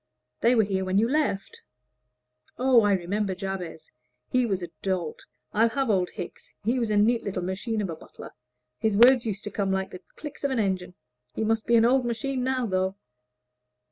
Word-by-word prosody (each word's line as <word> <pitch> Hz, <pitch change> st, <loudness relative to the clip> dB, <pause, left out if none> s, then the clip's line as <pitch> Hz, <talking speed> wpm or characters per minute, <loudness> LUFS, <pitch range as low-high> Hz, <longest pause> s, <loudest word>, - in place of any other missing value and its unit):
They 240 Hz, +2 st, +4 dB
were 220 Hz, -, +5 dB
here 195 Hz, -2 st, -1 dB
when 185 Hz, +1 st, 0 dB
you 220 Hz, +3 st, +4 dB
left." 275 Hz, -8 st, -1 dB, 1.0 s
"Oh, 255 Hz, -2 st, +5 dB
I 205 Hz, -1 st, +3 dB
remember 195 Hz, +2 st, -1 dB
Jabez 185 Hz, -4 st, -6 dB, 0.4 s
he 250 Hz, -1 st, +3 dB
was 190 Hz, -4 st, -1 dB
a 175 Hz, -, -5 dB
dolt. 185 Hz, -5 st, -3 dB, 0.3 s
I'll 225 Hz, +2 st, +4 dB
have 265 Hz, 0 st, 0 dB
old 185 Hz, -3 st, +1 dB
Hickes. 175 Hz, -, -8 dB
He 240 Hz, +5 st, +1 dB
was 230 Hz, -2 st, 0 dB
a 210 Hz, -, +2 dB
neat 230 Hz, +3 st, +3 dB
little 185 Hz, -3 st, -3 dB
machine 205 Hz, +5 st, -2 dB
of 190 Hz, -, -3 dB
a -, -, -5 dB
butler; -, -, -12 dB, 0.5 s
his 215 Hz, -2 st, +1 dB
words 240 Hz, +1 st, +6 dB
used 205 Hz, -1 st, -3 dB
to 210 Hz, -, -5 dB
come 195 Hz, -1 st, -1 dB
like 190 Hz, 0 st, -1 dB
the 185 Hz, -, -9 dB
clicks 295 Hz, -2 st, -9 dB
of 280 Hz, -, +2 dB
an 265 Hz, -, -1 dB
engine. 185 Hz, -4 st, -1 dB, 0.4 s
He -, -, -1 dB
must 220 Hz, 0 st, 0 dB
be 235 Hz, -, +4 dB
an 230 Hz, 0 st, +6 dB
old 255 Hz, +2 st, +4 dB
machine 250 Hz, +2 st, -2 dB
now, 255 Hz, -1 st, 0 dB
though." 190 Hz, -2 st, 0 dB
210 Hz, 200 wpm, -26 LUFS, 190-235 Hz, 1.0 s, words